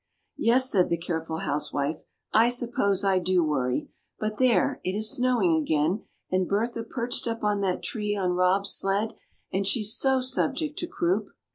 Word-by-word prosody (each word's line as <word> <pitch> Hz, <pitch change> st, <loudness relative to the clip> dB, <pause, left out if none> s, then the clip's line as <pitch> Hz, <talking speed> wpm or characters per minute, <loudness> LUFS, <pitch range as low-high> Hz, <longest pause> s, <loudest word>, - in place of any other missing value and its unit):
'" -, -, -51 dB
"Yes," 255 Hz, +3 st, +4 dB
said 185 Hz, -3 st, +3 dB
the 170 Hz, -, +1 dB
careful 160 Hz, -1 st, -4 dB
housewife, 145 Hz, +1 st, -2 dB, 0.3 s
"I 225 Hz, +2 st, +5 dB
suppose 230 Hz, -5 st, 0 dB
I 195 Hz, -2 st, +3 dB
do 180 Hz, -1 st, +2 dB
worry. 130 Hz, -5 st, -1 dB, 0.3 s
But 215 Hz, 0 st, -3 dB
there! 255 Hz, -3 st, +2 dB
it 185 Hz, -, -2 dB
is 215 Hz, +1 st, +1 dB
snowing 245 Hz, -9 st, +2 dB
again, 155 Hz, +6 st, 0 dB, 0.3 s
and 185 Hz, -1 st, +1 dB
Bertha 230 Hz, +3 st, -1 dB
perched 240 Hz, 0 st, -1 dB
up 230 Hz, -1 st, -3 dB
on 205 Hz, -1 st, +1 dB
that 185 Hz, -2 st, -1 dB
tree 210 Hz, -2 st, -2 dB
on 185 Hz, -3 st, 0 dB
Rob's 185 Hz, +2 st, +2 dB
sled, 200 Hz, +3 st, +1 dB, 0.4 s
and 190 Hz, +1 st, 0 dB
she 225 Hz, +1 st, +2 dB
so 260 Hz, +5 st, +2 dB
subject 275 Hz, +4 st, -1 dB
to 345 Hz, -, -3 dB
croup!" 345 Hz, +2 st, -1 dB
205 Hz, 170 wpm, -26 LUFS, 180-235 Hz, 0.4 s, I